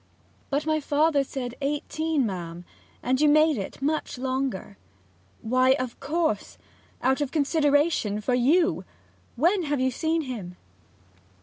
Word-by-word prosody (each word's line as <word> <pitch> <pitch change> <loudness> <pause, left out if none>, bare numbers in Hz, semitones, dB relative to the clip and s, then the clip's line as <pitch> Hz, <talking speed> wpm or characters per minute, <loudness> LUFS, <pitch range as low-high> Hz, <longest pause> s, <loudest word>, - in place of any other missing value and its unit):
'But 290 +2 -1
my 310 0 +1
father 295 0 +2
said 255 -3 -5
eighteen, 295 +1 -1
ma'am, 175 -3 -5 0.4
and 260 +3 +1
you 300 - +5
made 310 +1 +5
it 195 -5 -6
much 305 -2 -1
longer 255 -6 -3 0.3
' 90 +1 -35
'Why, 255 +3 +4
of 255 -3 -4
course 300 -6 -1 0.5
out 265 +3 +2
of 285 - 0
consideration 290 -7 +2
for 230 +4 -1
you! 315 +9 +3 0.5
When 345 - +2
have 290 -2 -1
ye 260 0 +1
seen 320 +4 0
him?' 205 -10 -7
275 Hz, 135 wpm, -26 LUFS, 245-310 Hz, 0.5 s, you